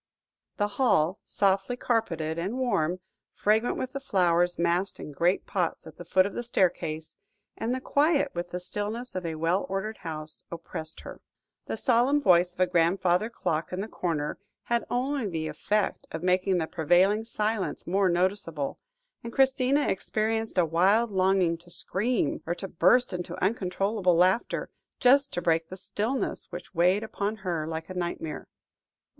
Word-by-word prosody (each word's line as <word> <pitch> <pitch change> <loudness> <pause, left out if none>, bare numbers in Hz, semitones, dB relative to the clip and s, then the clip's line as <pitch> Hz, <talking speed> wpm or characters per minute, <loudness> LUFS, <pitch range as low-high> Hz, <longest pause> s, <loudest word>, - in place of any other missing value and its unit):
The 205 - +1
hall, 185 -6 +3
softly 195 +4 +1
carpeted 170 -11 -1
and 195 +9 -2
warm, 185 -9 0 0.3
fragrant 220 +3 +2
with 255 - -3
the 275 - -4
flowers 175 -7 +2
massed 175 +3 0
in - - -7
great 170 +6 +1
pots 180 -4 -2
at 160 -1 -12
the - - -8
foot 185 +2 +4
of 200 - -4
the - - -3
staircase, 170 -8 -1 0.4
and 245 +3 -2
quiet 290 -1 +2
with 175 0 -4
the 180 - -4
stillness 210 +6 -3
of 185 -2 -3
a 160 - -3
well 165 +5 0
ordered 195 +3 -3
house, 155 -3 -3
oppressed 160 -1 -6
her. - - -10 0.5
The - - -3
solemn 255 +3 +3
voice 180 -7 +4
of 180 - -22
a 185 - +5
grandfather 180 +3 +2
clock 165 -8 -2
in 180 - -3
the 205 - -3
corner, 160 -8 -2 0.2
had 235 0 0
only 260 -1 -1
the 160 -4 -3
effect 195 +7 -1
of 165 - -5
making 185 +1 +2
the 165 - 0
prevailing 180 +7 +3
silence 215 -2 -2
more 190 +2 +2
noticeable, 175 -5 -1 0.4
and 235 - -6
Christina 270 +2 +3
experienced 220 +2 -1
a 180 - +5
wild 195 +8 +3
longing 185 -3 +2
to 175 - -17
scream, 205 - -1
or 170 - 0
to 195 - -5
burst 190 +7 +3
into 175 -1 -4
uncontrollable 195 -1 +1
laughter, 185 +6 +2 0.3
just 275 +2 +5
to 175 - -2
break 165 -1 +1
the 185 - -7
stillness 220 +7 -2
which 175 +2 -8
weighed 180 +4 +3
upon 210 -1 -2
her 165 -4 -1
like 160 0 -4
a 185 - -7
nightmare. 175 -3 -4
185 Hz, 160 wpm, -27 LUFS, 170-220 Hz, 0.5 s, a